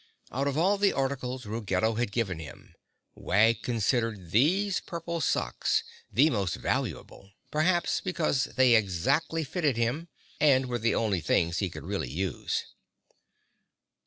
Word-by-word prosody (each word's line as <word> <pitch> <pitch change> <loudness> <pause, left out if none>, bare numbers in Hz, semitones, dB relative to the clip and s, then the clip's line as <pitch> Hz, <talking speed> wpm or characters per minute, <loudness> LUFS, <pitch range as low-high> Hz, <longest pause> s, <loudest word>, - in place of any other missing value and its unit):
Out 135 +4 -1
of 140 0 -1
all 195 +5 +2
the 200 -1 +3
articles 130 -2 -2
Ruggedo 110 0 0
had 115 -1 -1
given 100 -7 -1
him, 80 -3 -11 0.4
Wag 110 +3 +2
considered 115 -5 -1
these 180 - +3
purple 170 -1 -5
socks - - 0 0.3
the 150 +6 +4
most 100 -6 -1
valuable, 95 - -3 0.2
perhaps 175 +3 +1
because 160 -7 0
they 130 -2 +3
exactly 110 - +1
fitted 150 -4 -1
him 125 +9 -1 0.3
and 135 -3 +4
were 120 -1 -2
the 115 +1 +1
only 105 -6 0
things 85 +2 +1
he 95 - -1
could 75 -3 -9
really 90 -8 -3
use. 90 +5 -2
120 Hz, 135 wpm, -28 LUFS, 100-155 Hz, 0.4 s, the